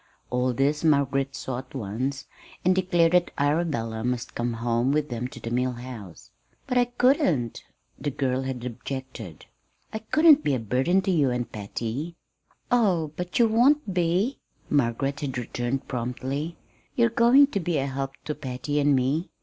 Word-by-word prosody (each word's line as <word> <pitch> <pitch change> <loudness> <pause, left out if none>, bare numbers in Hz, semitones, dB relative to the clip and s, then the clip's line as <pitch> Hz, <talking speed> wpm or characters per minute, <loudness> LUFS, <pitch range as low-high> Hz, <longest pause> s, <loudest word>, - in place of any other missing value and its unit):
All 125 +1 +1
this 140 +5 0
Margaret 140 -3 +2
saw 125 -2 -4
at 130 +1 -12
once 130 +5 -3 0.4
and 185 - +5
declared 175 -3 +3
that 180 -1 +3
Arabella 145 -7 0
must 125 -1 -2
come 120 0 -2
home 120 +2 0
with 150 0 0
them 120 0 -3
to - - -11
the 115 - -6
Mill 125 +1 0
House. 120 -8 -10 0.3
"But 250 -1 +1
I 245 - +4
couldn't," 245 - +1 0.4
the 145 - -2
girl 130 -1 -1
had 130 -2 -4
objected. 125 - -7 0.5
"I 220 - -2
couldn't 305 +6 +5
be 140 - +2
a - - -1
burden 130 - +1
to 190 - +1
you 150 -7 +3
and 125 -1 -2
Patty." 115 +10 -4 0.6
"Oh, 185 -11 +2
but 180 0 -4
you 235 - +5
won't 240 +1 +3
be," 180 +9 +1 0.3
Margaret 140 +1 +1
had 140 -4 -3
returned 120 +2 -3
promptly. 130 +6 -3 0.4
"You're 235 -1 +4
going 240 +5 +6
to 200 - 0
be 170 -3 -1
a 135 - 0
help 135 0 -3
to 150 - -2
Patty 135 +2 -3
and 145 -1 +4
me. 135 +7 0
135 Hz, 165 wpm, -26 LUFS, 125-175 Hz, 0.6 s, going